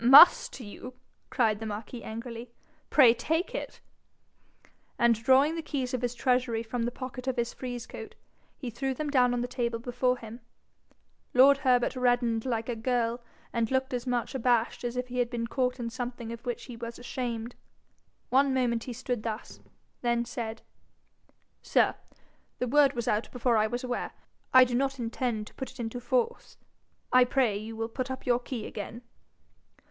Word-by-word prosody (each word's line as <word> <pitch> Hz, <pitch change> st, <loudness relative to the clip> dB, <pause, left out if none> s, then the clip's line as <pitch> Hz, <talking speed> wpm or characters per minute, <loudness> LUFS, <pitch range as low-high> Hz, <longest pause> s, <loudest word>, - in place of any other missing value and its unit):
'MUST 315 Hz, -, +8 dB
you?' 245 Hz, +3 st, -9 dB, 0.3 s
cried 220 Hz, -4 st, +2 dB
the 225 Hz, -, -5 dB
marquis 215 Hz, +3 st, -6 dB
angrily. 230 Hz, +1 st, -6 dB, 0.4 s
'Pray 255 Hz, -6 st, +7 dB
take 320 Hz, +9 st, -1 dB
it.' -, -, -5 dB, 1.2 s
And 235 Hz, 0 st, +5 dB
drawing 260 Hz, +7 st, +4 dB
the 330 Hz, -, -3 dB
keys 265 Hz, -5 st, -3 dB
of 255 Hz, -, -1 dB
his 245 Hz, -1 st, -1 dB
treasury 245 Hz, -2 st, +1 dB
from 230 Hz, +1 st, -2 dB
the 240 Hz, -, -1 dB
pocket 255 Hz, 0 st, -7 dB
of 260 Hz, -, +1 dB
his 235 Hz, 0 st, -1 dB
frieze 245 Hz, -2 st, -5 dB
coat, -, -, -9 dB, 0.4 s
he 250 Hz, -4 st, -5 dB
threw 265 Hz, +3 st, -2 dB
them 300 Hz, +2 st, -3 dB
down 250 Hz, -3 st, +4 dB
on 245 Hz, -1 st, 0 dB
the 245 Hz, -, -1 dB
table 240 Hz, -2 st, -1 dB
before 250 Hz, +1 st, 0 dB
him. 230 Hz, 0 st, -9 dB, 1.0 s
Lord 275 Hz, +2 st, +7 dB
Herbert 250 Hz, -2 st, +2 dB
reddened 245 Hz, -2 st, +1 dB
like 230 Hz, -2 st, -1 dB
a 240 Hz, -, -2 dB
girl, 235 Hz, 0 st, 0 dB, 0.3 s
and 230 Hz, -2 st, +1 dB
looked 265 Hz, 0 st, 0 dB
as 245 Hz, +1 st, -3 dB
much 245 Hz, +1 st, -1 dB
abashed 240 Hz, -3 st, +1 dB
as 240 Hz, 0 st, -3 dB
if 250 Hz, 0 st, -2 dB
he 250 Hz, 0 st, -3 dB
had 240 Hz, -1 st, +1 dB
been 235 Hz, -1 st, -2 dB
caught 250 Hz, +1 st, -1 dB
in 230 Hz, -1 st, -3 dB
something 240 Hz, -2 st, -5 dB
of 235 Hz, +2 st, -10 dB
which 240 Hz, -, -3 dB
he 245 Hz, -, -8 dB
was 230 Hz, 0 st, -7 dB
ashamed. 245 Hz, -2 st, -4 dB, 0.8 s
One 270 Hz, +1 st, +3 dB
moment 235 Hz, -3 st, +1 dB
he 250 Hz, -, -5 dB
stood 245 Hz, -1 st, -3 dB
thus, 220 Hz, 0 st, -5 dB, 0.4 s
then 235 Hz, -1 st, +1 dB
said, 230 Hz, -2 st, -5 dB, 1.0 s
'Sir, -, -, +3 dB, 0.6 s
the 250 Hz, -, -1 dB
word 280 Hz, +1 st, +5 dB
was 235 Hz, -3 st, -3 dB
out 210 Hz, +2 st, 0 dB
before 245 Hz, -1 st, +1 dB
I 215 Hz, 0 st, +3 dB
was 245 Hz, +3 st, -3 dB
aware. 250 Hz, -1 st, -3 dB, 0.4 s
I 255 Hz, 0 st, +9 dB
do 250 Hz, -1 st, -1 dB
not 270 Hz, +2 st, +1 dB
intend 230 Hz, -2 st, -2 dB
to -, -, -14 dB
put 265 Hz, -, -6 dB
it -, -, -15 dB
into 235 Hz, +1 st, -3 dB
force. 470 Hz, -, -1 dB, 0.6 s
I 255 Hz, 0 st, +8 dB
pray 245 Hz, -5 st, +1 dB
will 225 Hz, 0 st, -3 dB
you -, -, -4 dB
put 255 Hz, +3 st, -4 dB
up 260 Hz, 0 st, -5 dB
your 245 Hz, -1 st, +3 dB
key 245 Hz, -3 st, -5 dB
again?' 220 Hz, +3 st, -7 dB
245 Hz, 180 wpm, -29 LUFS, 230-255 Hz, 1.2 s, I